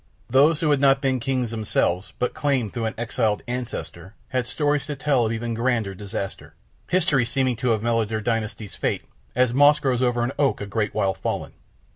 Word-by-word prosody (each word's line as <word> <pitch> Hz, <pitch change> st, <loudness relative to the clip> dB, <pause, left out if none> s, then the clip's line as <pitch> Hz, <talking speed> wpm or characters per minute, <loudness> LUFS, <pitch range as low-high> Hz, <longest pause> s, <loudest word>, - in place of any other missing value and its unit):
Those 150 Hz, +5 st, +5 dB
who 155 Hz, -2 st, +2 dB
had 145 Hz, -, +3 dB
not 135 Hz, -1 st, +5 dB
been 135 Hz, -2 st, 0 dB
kings 125 Hz, -2 st, -1 dB
themselves, 100 Hz, -4 st, 0 dB
but 125 Hz, -, -1 dB
claimed 130 Hz, -8 st, 0 dB
through 115 Hz, -2 st, -2 dB
an 110 Hz, -, -2 dB
exiled 115 Hz, -2 st, 0 dB
ancestor, 115 Hz, -6 st, -5 dB
had 125 Hz, -1 st, -1 dB
stories 145 Hz, 0 st, 0 dB
to 145 Hz, -, -3 dB
tell 135 Hz, -4 st, +2 dB
of -, -, -2 dB
even 115 Hz, +1 st, -2 dB
grander 115 Hz, -4 st, 0 dB
disaster, 95 Hz, 0 st, -6 dB, 0.3 s
history 150 Hz, -8 st, +2 dB
seeming 130 Hz, +1 st, 0 dB
to 125 Hz, +2 st, 0 dB
have 110 Hz, -2 st, +1 dB
mellowed 115 Hz, -2 st, +1 dB
their 110 Hz, -1 st, -1 dB
dynasty's 110 Hz, -2 st, -2 dB
fate -, -, -2 dB, 0.3 s
as 125 Hz, -1 st, +3 dB
moss 145 Hz, +3 st, +6 dB
grows 130 Hz, -4 st, 0 dB
over 120 Hz, -1 st, +2 dB
an 120 Hz, -, -1 dB
oak 140 Hz, -2 st, +2 dB
a 105 Hz, -, -4 dB
great 105 Hz, 0 st, -2 dB
while 95 Hz, -1 st, +1 dB
fallen. -, -, -4 dB
120 Hz, 195 wpm, -24 LUFS, 110-135 Hz, 0.3 s, moss